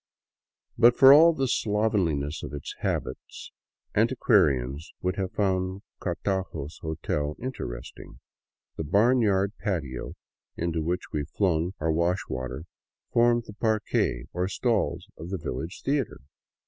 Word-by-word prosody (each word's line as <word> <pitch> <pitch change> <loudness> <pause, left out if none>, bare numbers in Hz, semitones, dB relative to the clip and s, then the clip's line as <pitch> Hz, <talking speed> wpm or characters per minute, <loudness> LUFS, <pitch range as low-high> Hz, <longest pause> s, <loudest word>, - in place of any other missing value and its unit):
But 120 +1 +6
for 135 0 +10
all 165 +3 +8
the 135 -5 -1
slovenliness 100 - 0
of - - -7
its 70 - -6
habits, - - -4 0.4
antiquarians 85 - +2
would 90 0 0
have 95 -2 -2
found 95 -1 0 0.2
Cartago's 90 -4 -3
hotel 75 -2 -2
interesting. - - -7 0.6
The - - -2
barnyard 100 - +3
patio 75 - -3 0.4
into 85 -1 -1
which 85 +3 -3
we 75 - 0
flung 90 -2 +1
our 80 +1 +1
wash 85 +3 +1
water 65 +3 -4 0.5
formed 120 0 +4
the 105 - -10
parquet, 110 - 0
or 90 +1 0
stalls, 110 +2 0
of 80 +2 -7
the 95 - -2
village 80 +3 -5
theater. 140 - -1
95 Hz, 120 wpm, -27 LUFS, 80-110 Hz, 0.6 s, for